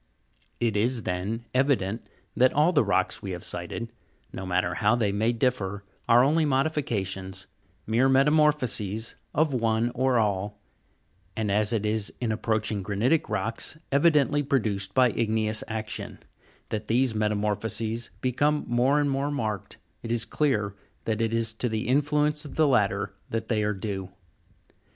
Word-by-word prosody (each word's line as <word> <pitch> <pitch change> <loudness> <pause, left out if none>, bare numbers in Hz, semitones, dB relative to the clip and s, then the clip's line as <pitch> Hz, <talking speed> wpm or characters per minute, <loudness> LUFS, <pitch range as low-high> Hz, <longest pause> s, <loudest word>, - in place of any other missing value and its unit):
It 115 -3 0
is, 115 +2 +1
then, 100 +6 -3
evident 125 -6 0 0.3
that 130 +1 +4
all 150 +4 +4
the 145 -7 +3
rocks 100 - 0
we 100 - -6
have 90 - -7
cited, 90 +7 -4 0.4
no 95 0 -6
matter 90 -1 0
how 105 +6 +2
they 110 -4 +1
may 110 +4 +1
differ, 110 -5 -1 0.3
are 120 +1 +7
only 155 +4 +3
modifications, 115 - -1 0.4
mere 120 +5 +2
metamorphoses 135 -7 +2 0.2
of 155 -2 +2
one 115 -1 +1
or 130 0 +2
all; 105 -1 -1 0.8
and, 110 -2 -1
as 105 +1 +1
it 110 -3 0
is 105 -1 0
in 120 -3 -1
approaching 110 -1 -1
granitic 110 - +1
rocks, 115 +6 -2
evidently 145 0 +3
produced 105 -9 -1
by 125 -2 +5
igneous 110 -1 0
action, 110 -1 -5 0.5
that 105 0 -4
these 125 +1 +2
metamorphoses 105 +2 -1
become 145 +4 +1
more 125 +5 +3
and 145 -1 +1
more 135 +1 0
marked, 110 -9 -3 0.3
jt 115 - -6
is 115 -1 0
clear 110 -6 0 0.3
that 110 0 -1
it 115 -1 +1
is 115 -1 0
to 120 +2 -1
the 110 0 -2
influence 150 +2 +2
of 145 - -9
the 155 -1 +4
latter 100 -6 +1 0.2
that 115 0 -3
they 110 -3 +1
are 105 0 0
due. 95 -2 -4
115 Hz, 150 wpm, -26 LUFS, 105-135 Hz, 0.8 s, are